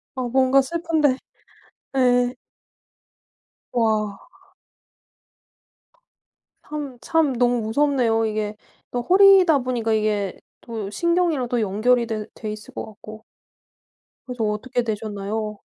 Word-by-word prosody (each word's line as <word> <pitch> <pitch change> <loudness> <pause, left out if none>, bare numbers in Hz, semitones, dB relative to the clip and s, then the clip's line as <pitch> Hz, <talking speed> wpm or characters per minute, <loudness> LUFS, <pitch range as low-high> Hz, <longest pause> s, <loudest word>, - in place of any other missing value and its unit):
어 255 -2 -2
뭔가 265 +2 +4
슬픈데. 320 -2 0 0.8
네. 250 -1 +2 1.4
와. 215 -3 0 2.4
참 290 -4 -6
참 320 -4 +1
너무 245 -1 +2
무섭네요. 230 -1 +1
이게 215 -1 -2 0.4
또 245 - -1
허리다 370 0 +6
보니까 245 -3 -1
이게 210 -3 -1 0.2
또 220 -4 -6
신경이랑도 305 - 0
연결이 235 +5 +2
돼 215 -2 -4
돼 215 -2 -6
있을 215 0 -10
것 - - -5
같고. 215 0 -12 1.0
그래서 250 -3 -4
어떻게 245 +4 -2
되셨나요? 215 -1 -4
240 Hz, 200 characters per minute, -22 LUFS, 215-270 Hz, 2.4 s, 허리다